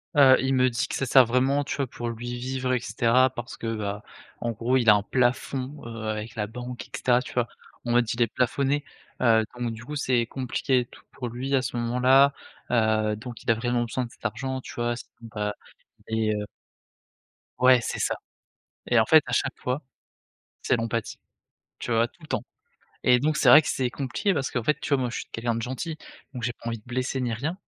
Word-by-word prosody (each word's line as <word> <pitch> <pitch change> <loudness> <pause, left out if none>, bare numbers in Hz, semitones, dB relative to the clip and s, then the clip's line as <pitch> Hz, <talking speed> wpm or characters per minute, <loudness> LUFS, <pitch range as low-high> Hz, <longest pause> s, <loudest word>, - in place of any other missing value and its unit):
Heu, 135 -2 +8
il 135 +1 +1
me 130 0 +4
dit 120 +1 -1
que - - -6
ça 135 - -1
sert 130 0 +7
vraiment, 130 +4 +2
tu - - -4
vois, 140 -2 0
pour 120 0 -5
lui, 120 +1 -5
vivre 130 +1 -2
et 125 - +2
caetera. 120 +2 +3
Parce 120 0 -7
que 115 0 -3
bah, 105 -1 -4 0.4
en 120 - -1
gros 120 +4 +1
il 115 -3 +3
a - - +10
un 100 - +1
plafond, 130 +3 0
heu, 115 -1 -7
avec 110 +3 -4
la 105 -2 -1
banque 125 +2 -7
et - - -33
caetera, 125 -1 +2
tu 125 - -9
vois? 120 -1 +1 0.4
En 120 - -1
mode, 120 -1 +3
il 120 - -3
est 120 - +5
plafonné, 135 +5 0 0.4
heu, 115 -3 +5 0.2
donc 120 -1 -1
du 110 - -9
coup 150 +5 -6
c'est 125 -4 +1
compliqué 130 +1 0
et - - -5
tout - - -17
pour 125 - -5
lui 130 +4 -4
à 135 - +3
ce 120 - -4
moment-là, 125 +4 +4 0.4
heu, 110 -2 +2
donc 120 +1 -9
il - - -5
a - - +3
vraiment 120 +1 0
besoin 125 +2 -2
de 120 - -12
cet - - -21
argent, 130 +4 -2
tu - - -10
vois? 120 0 -1
Sinon - - -10 0.2
bah, 105 -1 -2 0.5
il 110 -1 +1
est 105 - +1
heu 105 0 -4 1.1
Ouais 125 0 +7
c'est - - -4
ça, - - 0 0.7
et - - +3
en - - +5
fait - - +7
à - - -5
chaque - - +1
fois, 130 +4 -2 0.8
c'est 130 - +2
l'empathie, 115 -1 -3 0.6
tu - - -4
vois? 115 +1 +3
Tout 170 - -30
le 155 - -12
temps, - - -2 0.6
et 125 0 +5
donc 155 +3 +1
c'est - - +2
vrai 155 - +10
que 150 - -7
c'est 130 -2 0
compliqué, 145 +10 -1
parce 140 -4 -1
qu'en 125 - -2
fait, 150 - +2
tu - - -4
vois, 140 - +4
moi 125 -2 -1
je - - -4
suis - - -6
quelqu'un 115 0 -1
de 115 - -2
gentil, 130 +7 -4 0.4
donc 125 - -6
j'ai 120 - 0
pas 115 - -10
envie 115 -1 -3
de - - -27
blesser, 130 +2 -2
ni 120 -2 -1
rien 150 +10 -3
125 Hz, 235 wpm, -26 LUFS, 115-130 Hz, 1.1 s, a